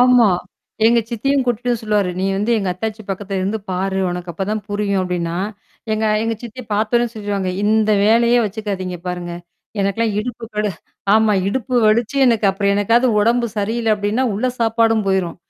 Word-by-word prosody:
ஆமாம். 240 -8 +5 0.5
எங்க 235 +1 +5
சித்தியும் 275 +4 +1
கூப்பிட்டு 245 +1 0
சொல்லுவார். 210 -3 +1
நீ - - 0
வந்து 210 +4 -1
எங்க 195 -3 -2
அத்தாச்சி 220 +3 -4
பக்கத்தில் 195 0 -3
இருந்து 200 +4 -1
பார், 190 +1 -1
உனக்கு 175 0 -5
அப்பொழுது 190 +4 -3
தான் 215 -1 -3
புரியும் 205 -1 0
அப்படினா, 175 -2 -2 0.6
எங்க 215 0 0 0.2
எங்க 225 0 -1
சித்தி 240 +2 -8
பார்த்தவுடனே 230 +3 +1
சொல்லிவிடுவாங்க. 205 -4 -2
இந்த 215 0 +3
வேலையே 235 +3 +4
வைச்சுக்காதீங்க 195 -3 -4
பாருங்க. 175 -1 -4 0.5
எனக்கெல்லாம் 205 +2 0
இடுப்பு 240 +1 -6
கடு 210 0 0 0.4
ஆமாம் 215 -3 +3
இடுப்பு 255 +3 -2
வலித்து 225 +5 +2
எனக்கு 230 -4 +3
அப்புறம் 200 +1 +1
என்றைக்காவது 230 +5 +3
உடம்பு 235 +3 +2
சரியில்ல 220 +2 0
அப்படினா 210 +4 -1
உள்ள 210 +6 -1
சாப்பாடும் 225 -1 +2
போய்ரும். 190 -3 0
215 Hz, 160 wpm, -19 LUFS, 195-230 Hz, 0.6 s, ஆமாம்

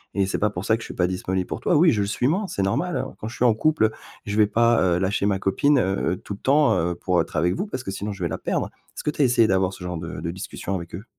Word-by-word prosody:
et 100 -1 +2
c'est - - -2
pas 105 - +2
pour 95 -1 -6
ça 110 - +3
que - - -11
je - - -8
suis - - -7
pas 90 - +2
disponible 95 0 -2
pour - - -4
toi. 175 - +2
Oui, 165 +2 +6
je 105 - +1
le 100 - 0
suis 115 +5 0
moins, 190 +8 0
c'est 100 - -2
normal, 170 - 0
hein. - - -4
Quand 105 - -5
je 120 - -9
suis 125 - +1
en 120 - +5
couple, 155 +1 +2
heu, 110 - +1 0.3
je 100 - -3
vais 105 -1 +5
pas, 115 +2 +3
heu, 90 -2 +3
lâcher 95 +1 0
ma 100 -2 +1
copine, 140 +10 +2
heu, 95 -2 0
tout 100 - -7
le - - -18
temps, 145 +2 +4
heu, 85 +1 0
pour 90 -1 +1
être - - -7
avec 85 +3 +2
vous 195 - -2
parce 130 -10 -5
que 95 - -4
sinon 100 +2 -4
je 95 -2 -6
vais 85 - 0
la - - -3
perdre». - - -1 0.3
Est-ce - - -6
que 150 - 0
tu 150 - -3
as - - +6
essayé 120 -3 +4
d'avoir 95 -1 +2
ce 95 - -10
genre 90 -1 -4
de 85 0 -6
de 85 +1 -3
discussion 95 +1 -5
avec 85 -2 -6
eux? 100 +5 -8
100 Hz, 335 wpm, -24 LUFS, 90-120 Hz, 0.3 s, Oui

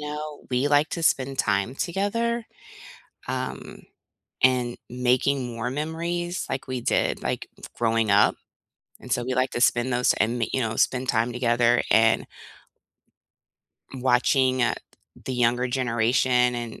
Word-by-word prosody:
know, 150 0 -6
we 130 +3 +1
like 145 +1 +3
to 170 - -4
spend 135 -3 +1
time 100 +3 0
together, 220 +8 -1 0.8
um, - - -5 0.6
and 125 -2 +2
making 125 +1 0
more 115 +1 -3
memories, 170 +4 -3
like 135 0 -4
we 130 -2 -3
did, - - 0
like, - - -3 0.3
growing 115 -2 +1
up, 100 +1 +4 0.7
and 125 - -6
so 120 - 0
we 130 +1 -2
like 130 0 +1
to - - -3
spend 120 +1 +2
those 125 +1 +3
in, 115 +2 0
you 130 - 0
know, 115 -2 -2
spend 130 0 +1
time 115 0 +1
together 120 0 +2
and 115 0 +4 1.7
watching, 130 0 +2
uh, 120 - +2 0.5
the 130 - -2
younger 125 +1 +1
generation 125 0 +1
and 120 -1 -6
125 Hz, 135 wpm, -25 LUFS, 120-135 Hz, 1.7 s, up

